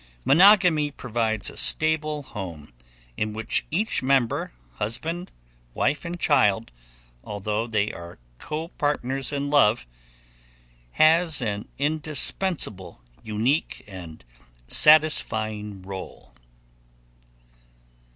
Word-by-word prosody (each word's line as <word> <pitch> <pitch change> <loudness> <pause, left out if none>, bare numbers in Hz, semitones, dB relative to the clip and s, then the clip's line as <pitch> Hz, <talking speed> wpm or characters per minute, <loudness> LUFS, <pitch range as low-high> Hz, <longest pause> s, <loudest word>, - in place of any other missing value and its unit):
Monogamy 170 - +5
provides 115 -5 -2
a - - -15
stable 155 -1 +1
home 85 - -9 0.4
in 105 0 -2
which 110 +1 -2
each 205 +8 -1
member 130 -3 +1 0.3
husband, 165 - -3 0.4
wife 145 - 0
and 175 +1 -5
child 110 -8 +2 0.5
although 105 +2 -3
they 105 -2 -1
are 85 0 -10 0.2
copartners 145 - -3
in 140 0 -3
love, 120 -6 +3 1.1
has 160 0 +4
an 105 -4 -3
indispensable, 150 - -1 0.2
unique, 115 +7 -1
and 85 -8 -11 0.4
satisfying 110 - +3
role. 95 -10 -9
130 Hz, 85 wpm, -24 LUFS, 105-155 Hz, 1.1 s, Monogamy